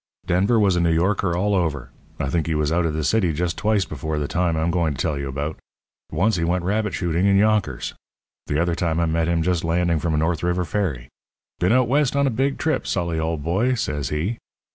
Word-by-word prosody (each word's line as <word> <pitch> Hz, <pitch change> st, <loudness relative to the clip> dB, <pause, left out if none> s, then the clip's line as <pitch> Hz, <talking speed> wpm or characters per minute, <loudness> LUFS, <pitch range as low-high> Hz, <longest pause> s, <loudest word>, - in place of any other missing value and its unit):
"Denver 100 Hz, +6 st, +2 dB
was 100 Hz, -4 st, +3 dB
a -, -, +1 dB
New 85 Hz, -1 st, +2 dB
Yorker 90 Hz, +1 st, +1 dB
all 100 Hz, +3 st, +1 dB
over. 80 Hz, -9 st, -1 dB, 0.3 s
I -, -, -1 dB
think 80 Hz, -3 st, 0 dB
he 80 Hz, -, 0 dB
was 75 Hz, 0 st, 0 dB
out 85 Hz, 0 st, +2 dB
of 75 Hz, -, -3 dB
the 80 Hz, -, -1 dB
city 90 Hz, +1 st, +2 dB
just 85 Hz, +2 st, -1 dB
twice 105 Hz, -3 st, +1 dB
before 75 Hz, +1 st, -4 dB
the 75 Hz, -1 st, -1 dB
time 85 Hz, -1 st, 0 dB
I'm 80 Hz, +2 st, +1 dB
going 85 Hz, -4 st, 0 dB
to -, -, -11 dB
tell 80 Hz, -3 st, 0 dB
you 70 Hz, 0 st, -4 dB
about. 70 Hz, +3 st, -4 dB, 0.5 s
Once 105 Hz, +2 st, +1 dB
he 85 Hz, -, -1 dB
went 90 Hz, +1 st, 0 dB
rabbit 105 Hz, +3 st, 0 dB
shooting 85 Hz, +1 st, 0 dB
in 100 Hz, 0 st, +4 dB
Yonkers. 105 Hz, -, +1 dB, 0.5 s
The 75 Hz, -, 0 dB
other 85 Hz, 0 st, +1 dB
time 85 Hz, -1 st, -1 dB
I 85 Hz, -, +2 dB
met 80 Hz, 0 st, 0 dB
him 85 Hz, -1 st, +1 dB
just 90 Hz, -1 st, 0 dB
landing 85 Hz, 0 st, +1 dB
from 80 Hz, +1 st, -1 dB
a -, -, 0 dB
North 80 Hz, +1 st, 0 dB
River 90 Hz, +1 st, 0 dB
ferry. 80 Hz, -12 st, -2 dB, 0.5 s
'Been 90 Hz, -, +2 dB
out 125 Hz, 0 st, +4 dB
West 140 Hz, +1 st, +2 dB
on 140 Hz, 0 st, +3 dB
a 135 Hz, -, +1 dB
big 135 Hz, +4 st, 0 dB
trip, 155 Hz, -4 st, -1 dB
Sully, 85 Hz, -3 st, -1 dB
old 80 Hz, -2 st, -2 dB
boy,' 105 Hz, -, +1 dB
says 75 Hz, -, -2 dB
he. 85 Hz, +10 st, -2 dB
85 Hz, 235 wpm, -22 LUFS, 80-100 Hz, 0.5 s, in